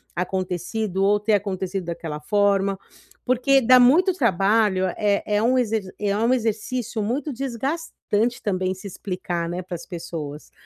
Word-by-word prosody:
acontecido 185 +2 -2
ou 205 +1 +3
ter 210 +1 +1
acontecido 190 -2 -1
daquela 165 -3 -5
forma. 200 +2 +2 0.5
Porque 255 +2 +4
dá 255 0 +6
muito 320 +10 +5
trabalho, 205 - +2
é 205 -1 +1
é 210 0 +1
um 255 +3 +3
exer 225 -4 0 0.2
é 200 -1 0
um 230 +4 +2
exercício 225 0 -2
muito 265 +8 -2
desgastante 245 -3 -2
também 185 -3 0
se 190 - -13
explicar, 175 -3 -4
né, 180 +1 -4
para 180 0 -6
as 170 - -8
pessoas. 160 -4 -7
205 Hz, 145 wpm, -23 LUFS, 185-240 Hz, 0.5 s, dá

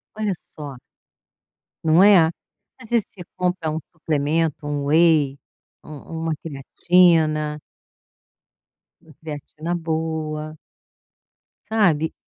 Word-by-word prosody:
Olha 215 -2 -1 0.2
só. 145 -3 -7 1.1
Não 160 +3 +5
é? 195 -5 +7 0.5
Às 225 - -12
vezes 235 -3 +2
você 185 - -13
compra 180 -3 -1
um 155 - -2 0.2
suplemento, 155 -1 -1
um 145 -1 -2
whey, 155 -3 +3 0.5
um 155 - -9 0.3
uma 165 - 0
creatina 155 0 +2 1.4
uma 155 - -18
creatina 155 +2 -5
boa. 160 -2 -3 1.1
Sabe? 175 -8 +2
160 Hz, 95 wpm, -22 LUFS, 150-175 Hz, 1.4 s, é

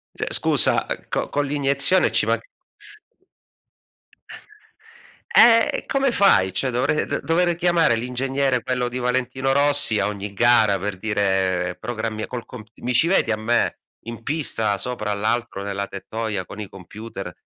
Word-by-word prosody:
Cioè - - -4
scusa, - - +2 0.2
co - - -3
con 145 0 -1
l'iniezione 140 +5 +2
ci - - +1
man - - +1 2.9
Eh, 230 0 +5
come 275 -1 +1
fai? 95 - +4
Cioè 130 +8 -1
dovrei 130 +5 0
dover 175 +2 0
d - - -8
chiamare 170 -7 +2
l'ingegnere, 130 +2 -1
quello 125 -1 -2
di 125 - -5
Valentino 130 +1 -1
Rossi, 140 -6 +4
a - - +1
ogni 100 -1 -6
gara 110 -3 +3
per 100 -1 -4
dire: 95 -3 -1
"Programmi 110 -2 -4
col 125 -2 -7
comp" 110 -3 -11
mi 125 +1 -2
ci 160 - +4
vedi 175 -11 +2
a 110 - 0
me, 115 +2 0 0.3
in 115 -1 -8
pista, 115 -9 0
sopra 105 -2 -3
l'arco 110 0 -2
nella 100 0 -3
tettoia 110 -5 -5
con 105 - -11
i 105 - -5
computer 100 +5 -9
120 Hz, 145 wpm, -22 LUFS, 105-135 Hz, 2.9 s, Eh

